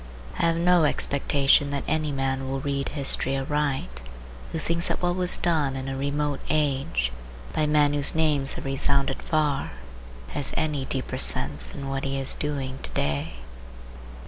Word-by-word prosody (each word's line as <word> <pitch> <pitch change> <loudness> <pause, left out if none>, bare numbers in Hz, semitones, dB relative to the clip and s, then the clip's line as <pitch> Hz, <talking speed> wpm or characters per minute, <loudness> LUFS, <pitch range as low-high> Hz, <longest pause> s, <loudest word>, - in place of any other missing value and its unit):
I 170 - +3
have 165 - +1
no 175 -1 +3
expectation 140 0 +2
that 140 -1 -3
any 155 -1 -1
man 135 -1 -2
will 135 0 -2
read 140 -1 -3
history 135 -2 +2
aright 135 - -2 0.5
who - - -3
thinks 170 +2 +1
that - - -2
what 175 0 0
was 180 -1 +1
done 155 -6 0
in 130 0 -5
a 135 - -4
remote 140 +1 -2
age, 135 - 0 0.4
by 155 - 0
men 150 -1 +3
whose 145 0 +4
names 150 -4 +3
have - - -7
resounded 135 0 +3
far, 150 - -1 0.6
has 145 -2 +1
any 150 -4 -1
deeper 130 0 -4
sense - - +3
than 135 - -7
what 135 0 -3
he 135 0 -2
is 135 -1 +1
doing 135 -3 -4
to - - -5
day. 70 -2 -2
140 Hz, 165 wpm, -25 LUFS, 135-150 Hz, 0.6 s, whose